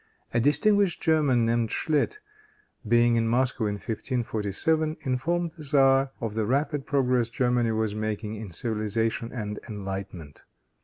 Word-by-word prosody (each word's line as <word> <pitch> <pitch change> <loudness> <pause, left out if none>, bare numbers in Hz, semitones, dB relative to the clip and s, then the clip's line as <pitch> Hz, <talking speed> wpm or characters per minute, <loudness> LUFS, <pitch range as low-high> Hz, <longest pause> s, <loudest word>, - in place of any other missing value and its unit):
A 120 - +3
distinguished 175 - +3
German, 145 -7 +2
named 115 -1 +1
Schlit, 155 - 0 0.7
being 120 +1 +4
in 115 0 +1
Moscow 125 -1 +1
in 105 - -2
1547, 120 +7 -1
informed 165 +7 -1
the 165 -1 -14
tzar 135 -2 +3
of 115 -4 -3
the 110 -1 -1
rapid 140 +2 0
progress 125 -4 +1
Germany 120 -1 +1
was 110 -1 -1
making 110 0 -3
in 110 -2 -7
civilization 110 +3 -2
and 105 -4 -5
enlightenment. 95 -7 -7
120 Hz, 135 wpm, -26 LUFS, 110-140 Hz, 0.7 s, being